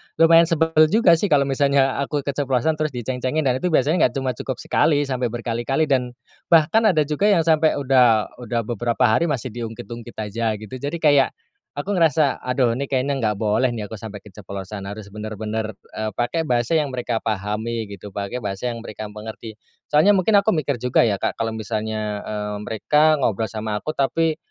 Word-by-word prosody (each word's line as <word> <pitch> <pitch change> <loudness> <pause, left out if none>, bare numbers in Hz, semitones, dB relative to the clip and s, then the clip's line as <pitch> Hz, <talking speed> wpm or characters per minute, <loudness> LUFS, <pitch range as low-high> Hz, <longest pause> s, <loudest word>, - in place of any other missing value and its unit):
lumayan 165 0 +6
sebel 160 -1 +1 0.2
juga 205 +1 +4
sih 205 - +1
kalau 145 -6 +4
misalnya 140 0 +1
aku 140 +1 -2
keceplosan 140 +2 0
terus 155 -3 -2
di 120 - -4
ceng-cengin 130 +5 -1
dan 130 -2 +1
itu 180 - -1
biasanya 155 +1 +3
nggak 125 - -12
cuma 135 -1 -1
cukup 120 - -5
sekali, 145 -2 +1
sampai 130 -3 -1
berkali-kali 120 +5 -1
dan 130 -4 0 0.3
bahkan 170 +7 +4
ada 160 -7 +3
juga 150 +8 0
yang 195 -6 +4
sampai 160 -1 +3
udah 125 -6 +3
udah 120 -1 -2
beberapa 120 0 -1
hari 110 +10 +3
masih 130 -5 -3
di 120 - -8
ungkit-ungkit 115 +1 -9
aja 110 +1 -2
gitu 105 -1 -11
jadi 145 +5 -3
kayak, 145 -3 +4 0.5
aku 145 +8 -4
ngerasa 155 -4 +3
aduh 125 -1 +2
ini 140 - -2
kayaknya 135 +1 0
nggak 110 -3 0
boleh 110 +4 +2
nih 105 -3 -5
aku 110 - -6
sampai 105 -1 -8
keceplosan 100 -1 -8
harus 100 0 -8
bener-bener, 110 +1 -4 0.2
eee, 110 -1 -3
pakai 120 +9 -1
bahasa 120 +5 +1
yang 150 - 0
mereka 120 -2 -2
pahami 110 +2 -3
gitu, 100 0 -10
pakai 100 +4 -3
bahasa 100 +2 -3
yang 115 - -6
mereka 110 0 -7
mengerti. 110 +1 -9 0.3
Soalnya 155 +8 +5
mungkin 195 +3 +3
aku 210 +2 +1
mikir 140 -4 -1
juga 125 +1 +2
ya 105 -4 +1
Kak - - -1
kalau 115 - 0
misalnya, 110 -1 -3
eee, 105 -1 -4
mereka 150 +9 +2
ngobrol 110 -4 0
sama 110 -1 -4
aku 155 - -3
tapi 155 +3 +1
125 Hz, 190 wpm, -22 LUFS, 110-150 Hz, 0.5 s, lumayan